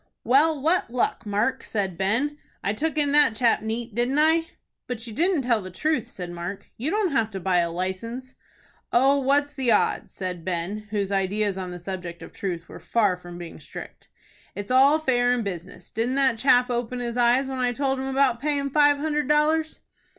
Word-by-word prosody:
"Well, 290 Hz, +5 st, +3 dB
what 325 Hz, +3 st, +1 dB
luck, 235 Hz, -2 st, -1 dB
Mark?" 205 Hz, +2 st, 0 dB
said 195 Hz, -4 st, -2 dB
Ben. 230 Hz, -, 0 dB, 0.2 s
"I 200 Hz, -, 0 dB
took 310 Hz, +8 st, -2 dB
in 290 Hz, -2 st, +2 dB
that 290 Hz, -6 st, +5 dB
chap 230 Hz, +1 st, +3 dB
neat, 225 Hz, +1 st, -4 dB
didn't 245 Hz, +5 st, 0 dB
I?" 320 Hz, +2 st, +3 dB, 0.4 s
"But 245 Hz, -3 st, -5 dB
you 225 Hz, -, -7 dB
didn't 335 Hz, -, +2 dB
tell 235 Hz, -3 st, +2 dB
the 185 Hz, -, -7 dB
truth," 300 Hz, -, -1 dB
said 180 Hz, -3 st, -7 dB
Mark. 175 Hz, +3 st, -6 dB
"You 260 Hz, +7 st, -3 dB
don't 410 Hz, -2 st, +1 dB
have 230 Hz, -6 st, +1 dB
to 195 Hz, -3 st, -6 dB
buy 185 Hz, -1 st, +2 dB
a 170 Hz, -1 st, +1 dB
license." 190 Hz, +9 st, -4 dB, 0.6 s
"Oh, 270 Hz, +3 st, +4 dB
what's 285 Hz, +2 st, +1 dB
the 265 Hz, -4 st, -1 dB
odds?" 210 Hz, -, +1 dB
said 180 Hz, -3 st, -5 dB
Ben, 185 Hz, +4 st, -3 dB
whose 200 Hz, -2 st, -2 dB
ideas 200 Hz, +1 st, 0 dB
on 185 Hz, -1 st, -5 dB
the 180 Hz, -, -6 dB
subject 175 Hz, -1 st, -6 dB
of -, -, -11 dB
truth 175 Hz, -4 st, -4 dB
were -, -, -10 dB
far 210 Hz, -5 st, +1 dB
from 175 Hz, -1 st, -11 dB
being 175 Hz, -1 st, -9 dB
strict. -, -, -10 dB, 0.5 s
"It's 205 Hz, +3 st, -5 dB
all 270 Hz, +4 st, +6 dB
fair 245 Hz, -5 st, +2 dB
in 245 Hz, -2 st, -1 dB
business. 185 Hz, -2 st, -7 dB
Didn't 235 Hz, +4 st, -1 dB
that 265 Hz, -4 st, +2 dB
chap 250 Hz, 0 st, +4 dB
open 245 Hz, +1 st, -2 dB
his 235 Hz, -1 st, -3 dB
eyes 245 Hz, +2 st, +3 dB
when 265 Hz, -1 st, -4 dB
I 250 Hz, -1 st, +1 dB
told 270 Hz, +1 st, -1 dB
him 265 Hz, -, -3 dB
about 265 Hz, -3 st, +2 dB
payin' 280 Hz, -2 st, -1 dB
five 290 Hz, 0 st, +5 dB
hundred 300 Hz, -1 st, -1 dB
dollars?" 310 Hz, +2 st, +2 dB
240 Hz, 200 wpm, -25 LUFS, 195-280 Hz, 0.6 s, all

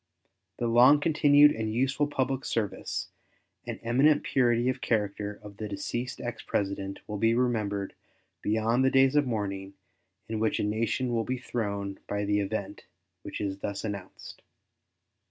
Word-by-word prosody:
The 120 Hz, -, -2 dB
long 125 Hz, +5 st, +6 dB
continued 150 Hz, -2 st, +5 dB
and 110 Hz, -3 st, -2 dB
useful 135 Hz, +5 st, +1 dB
public 135 Hz, -2 st, -1 dB
service 110 Hz, -4 st, -3 dB, 0.6 s
and -, -, -4 dB
eminent 135 Hz, +6 st, +3 dB
purity 120 Hz, -2 st, +2 dB
of 130 Hz, 0 st, -1 dB
character 105 Hz, -2 st, -1 dB
of 100 Hz, -1 st, -11 dB
the 110 Hz, -, -4 dB
deceased 120 Hz, +5 st, -4 dB
ex 120 Hz, -1 st, -5 dB
President 100 Hz, -1 st, -2 dB
will 105 Hz, -1 st, -4 dB
be 115 Hz, +1 st, +3 dB
remembered 105 Hz, -5 st, 0 dB, 0.5 s
beyond 110 Hz, +4 st, +1 dB
the 130 Hz, -, +5 dB
days 135 Hz, +1 st, +4 dB
of 145 Hz, -2 st, +3 dB
mourning 100 Hz, -4 st, -3 dB, 0.5 s
in 110 Hz, -1 st, -3 dB
which 110 Hz, 0 st, +1 dB
a -, -, 0 dB
nation 115 Hz, +4 st, 0 dB
will 115 Hz, -1 st, +1 dB
be 130 Hz, +3 st, -2 dB
thrown 100 Hz, -5 st, -3 dB
by 105 Hz, 0 st, -2 dB
the 105 Hz, 0 st, +1 dB
event 100 Hz, -1 st, -4 dB, 0.3 s
which -, -, -7 dB
is 100 Hz, -1 st, -3 dB
thus 100 Hz, 0 st, -4 dB
announced. 100 Hz, -4 st, -7 dB
115 Hz, 155 wpm, -28 LUFS, 105-130 Hz, 0.6 s, long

